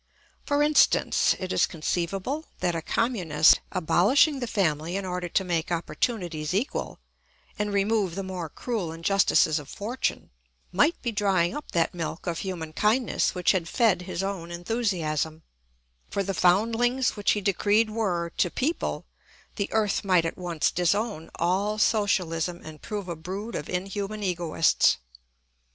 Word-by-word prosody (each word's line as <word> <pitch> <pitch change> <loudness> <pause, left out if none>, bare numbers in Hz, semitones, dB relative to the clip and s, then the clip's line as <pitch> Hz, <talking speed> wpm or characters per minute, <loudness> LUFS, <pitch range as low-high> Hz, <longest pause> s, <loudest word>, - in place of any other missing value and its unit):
For 290 0 +2
instance, 300 0 +3
it 185 0 -4
is - - +3
conceivable 190 - -2
that 175 - 0
a 165 - -2
communist, 170 -8 +3
abolishing 210 - +3
the 245 - -3
family 170 -5 0
in 195 0 -2
order 180 -1 -3
to 190 - +1
make 170 -2 -2
opportunities 170 -1 -2
equal 230 +8 -2 0.6
and 210 0 -1
remove 200 -2 +1
the 195 - -3
more 185 -4 -5
cruel 210 -3 -3
injustices 165 -2 +2
of 145 -2 -11
fortune, 230 +5 -3 0.4
might 290 - +2
be 240 - -1
drying 195 -4 +1
up 295 - -7
that 170 -1 +1
milk 165 -1 -5
of 170 -2 -2
human 170 -5 -5
kindness 220 +5 +1
which 180 -1 +3
had 175 -4 -1
fed 215 -7 +2
his 185 0 -4
own 195 -4 -4
enthusiasm; 170 - -2 0.7
for 200 - -1
the 195 +1 -2
foundlings 230 +8 +2
which 205 - +2
he 210 - -1
decreed 205 +3 +2
were 180 -6 -1
to 175 - +2
people 295 - -2 0.5
the 200 - -2
earth 215 -2 +1
might 180 -4 +3
at 165 - -2
once 175 -4 -1
disown 180 -1 0
all 195 +5 0
socialism 180 -6 +1
and 155 -1 -10
prove 205 -3 -5
a 170 - -4
brood 190 +8 -6
of - - -5
inhuman 195 +3 -3
egoists. 170 - +2
190 Hz, 150 wpm, -26 LUFS, 170-215 Hz, 0.7 s, instance